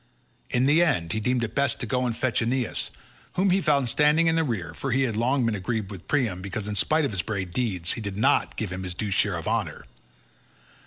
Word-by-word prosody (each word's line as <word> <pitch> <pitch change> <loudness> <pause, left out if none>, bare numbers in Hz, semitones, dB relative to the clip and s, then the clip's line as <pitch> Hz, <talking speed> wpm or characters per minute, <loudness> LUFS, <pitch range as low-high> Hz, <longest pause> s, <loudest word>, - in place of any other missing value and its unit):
In 125 +1 +2
the 150 +5 +5
end, 90 - +1
he 110 - -1
deemed 125 +2 0
it 115 - -3
best 140 -3 +1
to - - -2
go 125 +3 0
and 115 - -2
fetch 125 -4 0
Aeneas, 120 +1 -1 0.4
whom 185 +1 +2
he 190 +2 +3
found 140 -6 +2
standing 150 +6 +3
in 165 0 +3
the 165 - +2
rear, 115 - -3
for 135 - -4
he 130 +2 +2
had 115 -5 -1
long 125 +3 +1
been 115 - +1
aggrieved 105 +1 -3
with 95 -3 -10
Priam 115 -11 0
because 100 +2 -5
in 105 - -3
spite 155 +9 +2
of 140 - -2
his 95 -4 -1
brave 95 -3 -4
deeds 95 -8 0
he - - -5
did 100 -2 -5
not 135 +7 +2
give 105 -5 -3
him 90 0 -4
his 90 -2 -6
due 105 +1 -3
share - - +1
of - - -6
honour. - - -2
115 Hz, 245 wpm, -26 LUFS, 100-140 Hz, 0.4 s, the